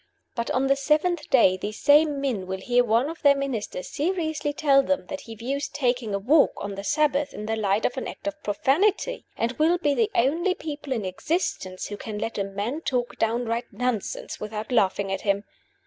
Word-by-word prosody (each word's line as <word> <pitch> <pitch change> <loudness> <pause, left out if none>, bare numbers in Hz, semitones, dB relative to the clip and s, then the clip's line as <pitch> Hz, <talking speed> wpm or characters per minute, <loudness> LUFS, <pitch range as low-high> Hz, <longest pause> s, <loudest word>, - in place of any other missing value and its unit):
But 235 -2 -3
on 260 +1 +1
the 275 0 +4
seventh 300 +3 +1
day 190 -8 +5
these 210 +3 -5
same 295 0 +5
men 240 -10 -2
will 190 0 -3
hear 245 +5 +2
one 235 +3 +2
of 330 +2 -7
their 285 -1 +6
ministers 245 -9 -3
seriously 315 -2 -1
tell 285 -2 +4
them 280 +1 -1
that 285 - -5
he 225 - -7
views 275 +6 -3
taking 245 -6 -1
a - - +1
walk 280 +10 +4
on 200 0 -5
the 195 0 -6
Sabbath 290 +3 +1
in 210 - -6
the 225 +1 -1
light 210 0 +1
of - - 0
an 260 - -3
act - - -9
of 300 0 -4
profanity, 370 - +1
and 230 +1 0
will 330 +3 +4
be 295 -5 +1
the 440 +7 +2
only 335 +10 +2
people 295 -2 -7
in 225 -6 -1
existence 185 - -2
who 205 - -5
can 215 0 -6
let 215 +1 -3
a - - +1
man 205 +10 -3
talk 245 -5 -2
downright 230 +1 0
nonsense 235 -1 -3
without 215 +2 -5
laughing 195 -4 +2
at 195 - -2
him. 200 -1 +1
250 Hz, 205 wpm, -25 LUFS, 210-295 Hz, -, their